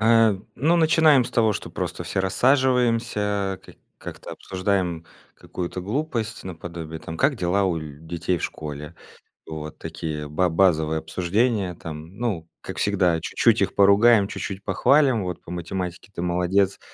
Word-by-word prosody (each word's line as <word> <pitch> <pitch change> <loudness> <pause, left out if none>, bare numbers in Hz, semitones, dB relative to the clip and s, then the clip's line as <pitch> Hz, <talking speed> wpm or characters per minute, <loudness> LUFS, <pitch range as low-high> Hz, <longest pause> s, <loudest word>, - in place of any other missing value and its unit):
А, 115 -1 +5 0.2
ну, 160 +6 +2
начинаем 160 -5 +5
с - - -5
того, 110 -2 +3
что - - -5
просто - - -4
все - - -1
рассаживаемся, 115 -4 +1
ка - - -14 0.2
как-то - - -9
обсуждаем 95 -3 -2 0.3
какую-то 90 +1 -6
глупость, 115 - -3
наподобие, 85 -2 -7
там: 80 +1 -7
как 135 - +2
дела 95 0 +1
у 90 -3 +1
ль 75 -2 -9
детей 85 +2 -2
в - - -8
школе? 75 +1 -6 0.5
Вот 75 -1 -7
такие 75 -2 -5
ба 90 +4 +1
базовые 80 -3 +2
обсуждения. 100 +3 0
Там, 80 +2 -9
ну 100 -9 -2
как - - -7
всегда 90 -5 +2
чуть-чуть 115 +4 +2
их 95 -1 0
поругаем 100 +2 +5
чуть-чуть 100 -1 -5
похвалим 130 -4 +3
вот 90 -2 -5
по - - -14
математике 90 +2 -5
ты 85 - -3
молодец, 90 +2 +1
95 Hz, 150 wpm, -24 LUFS, 85-115 Hz, 0.5 s, А